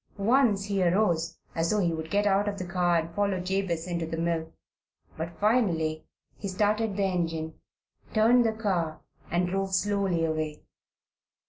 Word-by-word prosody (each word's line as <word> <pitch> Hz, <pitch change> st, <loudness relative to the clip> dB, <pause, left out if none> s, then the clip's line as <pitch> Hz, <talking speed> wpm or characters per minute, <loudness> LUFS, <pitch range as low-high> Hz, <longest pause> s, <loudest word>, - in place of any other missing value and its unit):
Once 215 Hz, -1 st, +3 dB
he 200 Hz, -2 st, -1 dB
arose, 170 Hz, -3 st, +1 dB, 0.2 s
as 165 Hz, 0 st, 0 dB
though 215 Hz, -, +2 dB
he 175 Hz, -5 st, +1 dB
would 160 Hz, 0 st, -5 dB
get 205 Hz, +3 st, +1 dB
out 200 Hz, 0 st, +3 dB
of 200 Hz, -1 st, -2 dB
the 185 Hz, -, -4 dB
car 175 Hz, -1 st, +2 dB
and 165 Hz, 0 st, -3 dB
follow 200 Hz, -1 st, 0 dB
Jabez 180 Hz, -2 st, -1 dB
into 170 Hz, -2 st, -2 dB
the 165 Hz, -, -4 dB
mill. 165 Hz, -1 st, -1 dB, 0.6 s
But 165 Hz, +1 st, -6 dB
finally 175 Hz, -9 st, +1 dB, 0.3 s
he 200 Hz, -, -4 dB
started 210 Hz, +2 st, 0 dB
the 200 Hz, -, +1 dB
engine, 165 Hz, -4 st, -1 dB, 0.6 s
turned 235 Hz, +3 st, +5 dB
the 225 Hz, -, +2 dB
car, 180 Hz, -8 st, -1 dB, 0.3 s
and 175 Hz, +1 st, +1 dB
drove 195 Hz, +1 st, -1 dB
slowly 195 Hz, -4 st, +1 dB
away. 155 Hz, -1 st, -3 dB
185 Hz, 160 wpm, -28 LUFS, 165-205 Hz, 0.6 s, turned